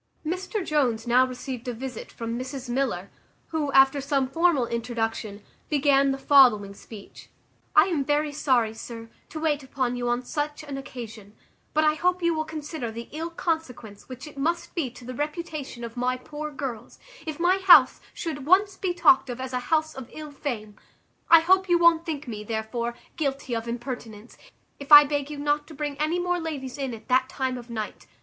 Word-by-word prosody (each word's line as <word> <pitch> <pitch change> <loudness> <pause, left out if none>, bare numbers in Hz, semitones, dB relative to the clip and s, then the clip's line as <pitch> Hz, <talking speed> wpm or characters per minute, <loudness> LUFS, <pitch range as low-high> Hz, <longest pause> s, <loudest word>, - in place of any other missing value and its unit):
Mr 370 +4 -3
Jones 255 -7 +1
now 250 +2 +4
received 255 0 -7
a 245 - -2
visit 250 0 -7
from 230 0 -5
Mrs 260 +1 -6
Miller, 240 -7 -2 0.4
who, 305 -3 -1
after 270 +1 +5
some 275 -1 0
formal 325 -2 +2
introduction, 225 -3 -3 0.3
began 280 -2 +3
the 270 - -1
following 245 -8 +5
speech: 200 0 -13 0.5
"I 310 - +9
am 335 -6 0
very 295 +1 0
sorry, 255 -6 +1
sir, 230 0 -9 0.2
to 315 - -6
wait 305 -2 0
upon 260 -2 -2
you 245 0 -2
on 240 +1 -1
such 295 +2 -3
an 285 -2 -6
occasion; 225 -6 -9 0.4
but 310 - +4
I 305 0 +4
hope 360 +3 0
you 340 0 +3
will 315 -1 -2
consider 310 -5 -5
the 230 +1 -8
ill 320 +3 -4
consequence 315 - -4
which 255 +2 -8
it 295 -2 -10
must 335 +5 -1
be 315 -7 -1
to 245 0 -14
the 255 - -6
reputation 295 -3 -5
of 230 0 -7
my 250 +1 0
poor 300 +4 -6
girls, 265 -6 -6 0.3
if 310 -1 -4
my 360 +3 +3
house 350 -9 +7
should 295 -5 -5
once 390 +3 +4
be 360 -2 -2
talked 270 -6 +5
of 245 0 -5
as 260 0 -5
a 250 - 0
house 315 -1 +2
of 260 -2 -9
ill 305 -1 -8
fame. 220 -8 -5 0.5
I 330 -1 +9
hope 375 +2 +3
you 350 - +5
won't 340 0 +4
think 300 -3 -4
me, 215 -3 -5
therefore, 230 +2 -3 0.2
guilty 275 -4 -2
of 230 0 -4
impertinence, 235 -2 -6 0.4
if 280 +1 -10
I 295 0 +12
beg 290 -1 -2
you 300 - -6
not 290 +1 0
to 315 - -11
bring 290 0 -3
any 310 +3 +1
more 355 0 0
ladies 285 -5 -5
in 265 -4 -3
at 220 - -15
that 260 +1 +3
time 260 -2 -2
of 240 0 -13
night. 220 -2 -6
275 Hz, 195 wpm, -26 LUFS, 240-310 Hz, 0.5 s, I